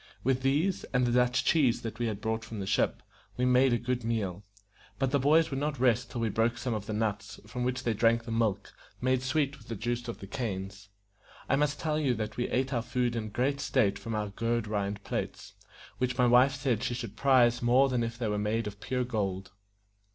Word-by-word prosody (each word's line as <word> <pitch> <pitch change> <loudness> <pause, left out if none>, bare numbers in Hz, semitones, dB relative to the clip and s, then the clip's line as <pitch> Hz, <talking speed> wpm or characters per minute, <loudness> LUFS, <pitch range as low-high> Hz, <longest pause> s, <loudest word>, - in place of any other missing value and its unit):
With 130 0 +1
these, 150 +8 +1
and 125 0 +4
the 120 - +1
Dutch 125 +1 +2
cheese 135 -7 +3
that 115 0 -5
we 120 -2 0
brought 110 +2 -3
from 110 -1 -7
the 95 - -3
ship, 100 +1 0 0.3
we 125 - +1
made 125 +1 +4
a 120 - +3
good 125 0 -2
meal; 105 -5 -2 0.5
but 135 -1 0
the 140 - +3
boys 155 +4 +4
would 135 - -2
not 145 -2 -2
rest 120 -3 +2
till 120 - -4
we 115 - +1
broke 115 +3 +1
some 125 0 -2
of 105 -1 -4
the - - -3
nuts, 105 -1 -2
from 125 +4 -4
which 125 +1 -1
they 115 - +1
drank 115 +2 +3
the 115 - -6
milk, 110 -3 -1 0.3
made 130 0 +1
sweet 140 +1 0
with 110 - -17
the 115 - -4
juice 120 +3 -3
of 115 - -5
the - - -9
canes. 100 -4 -5 0.6
I - - +3
must 145 +1 0
tell 155 -1 0
you 135 -5 +1
that 110 0 -4
we 120 - -2
ate 130 +2 0
our 120 - +1
food 120 0 -1
in 110 -2 -3
great 130 +6 0
state 110 -8 +1
from 115 -2 -4
our 105 -1 -2
gourd 115 +2 -1
rind 100 -1 -3
plates, - - -4 0.5
which 125 0 -1
my 125 - +4
wife 125 +3 +5
said 130 -5 0
she 120 - -1
should 115 -5 -6
prize 125 -3 +4
more 125 +3 +4
than 125 -2 0
if 115 0 -4
they 120 -2 -2
were 105 -1 -1
made 110 +2 0
of 105 0 -7
pure 125 0 -1
gold. 100 -6 -3
120 Hz, 230 wpm, -29 LUFS, 110-130 Hz, 0.6 s, wife